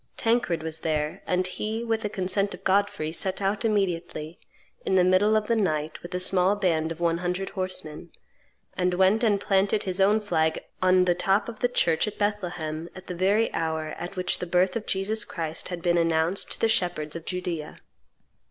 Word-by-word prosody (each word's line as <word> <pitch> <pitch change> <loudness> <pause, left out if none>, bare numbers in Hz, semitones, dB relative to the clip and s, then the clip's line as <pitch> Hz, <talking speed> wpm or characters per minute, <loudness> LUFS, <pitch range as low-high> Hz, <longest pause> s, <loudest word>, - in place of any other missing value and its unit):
Tancred 225 -8 +1
was 160 0 -4
there; 155 +2 -2
and 180 0 +1
he, 215 +5 -3
with 225 -1 -1
the 210 - -2
consent 195 +1 0
of - - -19
Godfrey, 195 -5 +1
set 190 +3 -2
out 200 +2 0
immediately, 175 -6 -1 0.4
in 190 - 0
the 185 - +5
middle 190 +4 +4
of 215 - -1
the 230 - +1
night, 155 -7 -1
with 175 - -9
a - - 0
small 185 +1 +3
band 165 -5 0
of 165 - -6
one 170 -1 +1
hundred 180 +2 -2
horsemen, 185 -4 -4 0.7
and 180 0 +1
went 190 +5 +3
and 205 -3 +3
planted 200 +1 +2
his 185 0 -1
own 205 +3 +4
flag 160 -6 0 0.2
on 185 0 +4
the 175 - +3
top 195 +3 +1
of 230 -2 -8
the 245 - +2
church 165 -6 +2
at 210 - -5
Bethlehem 175 -6 -2
at 185 0 -10
the 180 - -5
very 200 +5 +2
hour 160 -1 -2
at 175 +3 -6
which 180 -1 0
the 180 - -4
birth 180 +2 +2
of 230 - -4
Jesus 210 +3 0
Christ 160 -3 -4
had 175 -2 -6
been 175 -1 +3
announced 165 +2 +1
to - - -11
the 225 - +3
shepherds 175 -7 0
of 170 - -6
Judea. 175 -4 -4
185 Hz, 200 wpm, -26 LUFS, 165-200 Hz, 0.7 s, the